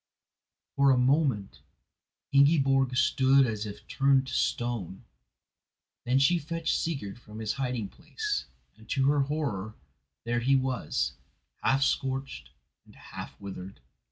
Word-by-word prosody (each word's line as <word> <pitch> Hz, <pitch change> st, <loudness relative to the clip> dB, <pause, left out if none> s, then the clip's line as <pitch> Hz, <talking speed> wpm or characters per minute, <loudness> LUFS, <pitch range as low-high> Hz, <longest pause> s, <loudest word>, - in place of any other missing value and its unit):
For 140 Hz, 0 st, +4 dB
a 130 Hz, -, +5 dB
moment 130 Hz, -6 st, +1 dB, 0.7 s
Ingiborg 135 Hz, -2 st, +4 dB
stood 135 Hz, 0 st, +4 dB
as 110 Hz, -2 st, -3 dB
if 100 Hz, -, -10 dB
turned 135 Hz, -1 st, +3 dB
to 130 Hz, -, -7 dB
stone, 120 Hz, -8 st, -2 dB, 1.0 s
then 125 Hz, +2 st, +2 dB
she 155 Hz, +6 st, +4 dB
fetched 165 Hz, +1 st, -2 dB
Sigurd 125 Hz, -11 st, -3 dB
from 105 Hz, -2 st, -12 dB
his 110 Hz, -1 st, -2 dB
hiding 125 Hz, -5 st, -2 dB
place, 420 Hz, -, -4 dB, 0.3 s
and, 110 Hz, 0 st, -18 dB
to 135 Hz, 0 st, +2 dB
her 145 Hz, -, +1 dB
horror, 135 Hz, -8 st, -2 dB, 0.5 s
there 120 Hz, 0 st, 0 dB
he 135 Hz, +3 st, +3 dB
was, 125 Hz, -, -1 dB, 0.5 s
half 135 Hz, +1 st, +2 dB
scorched 135 Hz, -, -2 dB, 0.3 s
and -, -, -20 dB
half -, -, -10 dB
withered. 95 Hz, -1 st, -8 dB
130 Hz, 130 wpm, -28 LUFS, 110-140 Hz, 1.0 s, a